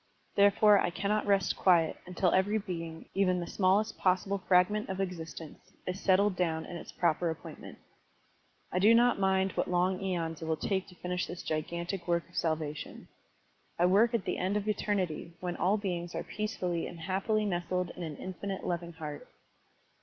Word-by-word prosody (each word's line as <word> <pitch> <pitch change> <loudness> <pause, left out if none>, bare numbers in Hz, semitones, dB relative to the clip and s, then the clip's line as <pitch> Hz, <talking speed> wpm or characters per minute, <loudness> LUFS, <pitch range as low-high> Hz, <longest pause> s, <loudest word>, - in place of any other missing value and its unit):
There 200 0 +6
fore 205 0 +5
I - - +1
cannot 205 +4 -1
rest 195 -2 +2
quiet, 170 -4 +4
tmtil 180 0 +1
every 200 +3 +3
being, 165 -5 -5
even 185 -2 +2
the 175 - -3
smallest 200 +4 +1
possible 190 +2 +1
fragment 190 +3 +2
of 190 0 -3
existence, 165 -4 -6
is 180 +1 -3
settled 195 +1 +3
down 165 -3 0
in - - -8
its 170 - -8
proper 170 0 +1
appointment. 160 - -8 0.9
I 180 - +1
do 215 +4 +6
not 240 -2 +4
mind 190 0 +2
what - - -1
long 180 +1 +1
eons 170 -4 -2
it - - -4
will 160 0 0
take 190 +2 -1
to 180 - -15
finish 180 +1 -3
this 175 - -7
gigantic 170 +4 -3
work 170 -1 +1
of 175 - -21
salvation. 155 -2 -3 0.7
I 175 - +4
work 215 +6 +4
at 220 - -1
the - - -2
end 190 +3 0
of 210 0 -3
eternity 190 -6 -1
when 175 -1 -3
all 195 +5 +2
beings 175 -4 -3
are - - -2
peacefully 185 -6 -2
and 170 -2 -9
happily 195 +4 0
nestled 180 -1 -1
in - - -10
an 160 -3 -4
infinite 190 +1 -5
loving 170 -1 -3
heart." 150 -3 -7
180 Hz, 180 wpm, -31 LUFS, 170-195 Hz, 0.9 s, There